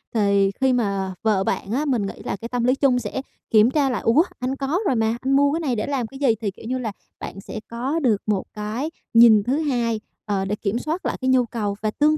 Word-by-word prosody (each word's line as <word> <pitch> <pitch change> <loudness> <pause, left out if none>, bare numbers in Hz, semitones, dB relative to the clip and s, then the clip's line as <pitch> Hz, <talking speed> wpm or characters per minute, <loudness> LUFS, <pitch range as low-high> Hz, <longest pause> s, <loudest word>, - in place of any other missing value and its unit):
Thì 200 -2 +3
khi 265 -1 +4
mà 200 -5 -1
vợ 210 -4 +2
bạn 195 - -2
á, 275 +6 0
mình 245 -8 +1
nghĩ 195 - -4
là - - -2
cái 225 +4 -8
tâm 245 -1 -1
lý 250 +2 +3
chung 270 -3 +3
sẽ 240 +3 -4 0.3
kiểm 220 +2 +5
tra 280 -1 +2
lại: 250 - -2
"Ủa 235 +9 +4 0.2
anh 255 +2 -2
có 275 +6 -1
rồi 260 - +2
mà, 225 0 +1
anh 265 - -1
mua 285 +1 +4
cái 325 - 0
này 280 -7 -1
để 215 - -2
làm 270 -5 -1
cái 270 +3 -11
gì?" 260 -6 +3
Thì, 205 -3 -1
kiểu 200 - -14
như 255 +2 -1
là, 235 -4 -3 0.3
bạn 195 - -7
sẽ 215 - -7
có 255 +7 -2
được 230 -9 +2
một 205 -3 0
cái 215 +8 -3 0.2
nhìn 230 -3 +7
thứ 255 +6 0
hai, 240 -7 0 0.3
ờ, 200 -2 -1
để 200 +2 -1
kiểm 210 +2 -2
soát 320 +7 -3
lại - - -1
cái 260 - +1
nhu 255 -1 +4
cầu. 210 -3 -3
Và 215 0 0
tương 305 +5 +2
235 Hz, 260 wpm, -23 LUFS, 210-270 Hz, 0.3 s, nhìn